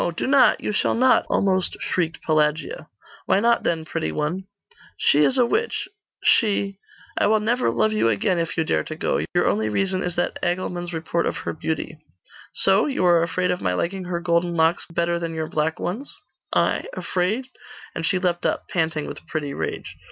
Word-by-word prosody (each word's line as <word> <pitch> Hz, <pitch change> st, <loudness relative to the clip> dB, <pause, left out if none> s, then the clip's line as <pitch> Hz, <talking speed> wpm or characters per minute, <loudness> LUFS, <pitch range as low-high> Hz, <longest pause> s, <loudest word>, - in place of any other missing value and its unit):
do -, -, -1 dB
not! 265 Hz, -2 st, +5 dB
you -, -, -3 dB
shall -, -, +1 dB
not!' 255 Hz, +2 st, +4 dB
almost 190 Hz, -2 st, +1 dB
shrieked 165 Hz, -3 st, -2 dB
Pelagia. 155 Hz, 0 st, 0 dB, 0.4 s
'Why -, -, +4 dB
not, 235 Hz, +2 st, +3 dB
then, 160 Hz, -2 st, -1 dB
pretty 80 Hz, -, -3 dB
one?' 165 Hz, -, -2 dB, 0.5 s
'She 145 Hz, -, +3 dB
is 255 Hz, -, +4 dB
a 250 Hz, -, +5 dB
witch 450 Hz, -, -1 dB, 0.4 s
she 200 Hz, -3 st, +2 dB, 0.4 s
I -, -, +3 dB
will 215 Hz, +1 st, +3 dB
never 235 Hz, +4 st, +1 dB
love 215 Hz, -, +1 dB
you 215 Hz, -, +2 dB
again 115 Hz, -, +1 dB
if 165 Hz, +1 st, -3 dB
you 165 Hz, -, +2 dB
dare -, -, 0 dB
to 155 Hz, -, -6 dB
go. -, -, -1 dB
Your 175 Hz, -, +3 dB
only 110 Hz, +1 st, +1 dB
reason 190 Hz, -, 0 dB
is 180 Hz, -2 st, -3 dB
that 175 Hz, -, -2 dB
Agilmund's 175 Hz, 0 st, -2 dB
report 165 Hz, +1 st, -1 dB
of -, -, -2 dB
her -, -, -2 dB
beauty.' -, -, -4 dB, 0.5 s
'So? -, -, +4 dB
You 265 Hz, -10 st, 0 dB
are 170 Hz, -1 st, +5 dB
afraid 180 Hz, +2 st, 0 dB
of 180 Hz, -, -2 dB
my 90 Hz, -1 st, 0 dB
liking 185 Hz, -, -2 dB
her 175 Hz, -1 st, -2 dB
golden 170 Hz, 0 st, 0 dB
locks 160 Hz, +1 st, +2 dB
better 170 Hz, +1 st, 0 dB
than 165 Hz, -1 st, -4 dB
your 160 Hz, -1 st, -2 dB
black 160 Hz, +2 st, -1 dB
ones?' 225 Hz, +11 st, -4 dB, 0.3 s
'I? -, -, +1 dB
Afraid?' 215 Hz, -, -1 dB, 0.4 s
And 165 Hz, -, -4 dB
she 185 Hz, -, +2 dB
leapt 180 Hz, -2 st, -1 dB
up, -, -, -1 dB
panting 160 Hz, -3 st, -1 dB
with -, -, -9 dB
pretty 145 Hz, -3 st, -3 dB
rage. -, -, -5 dB
175 Hz, 190 wpm, -23 LUFS, 160-195 Hz, 0.5 s, not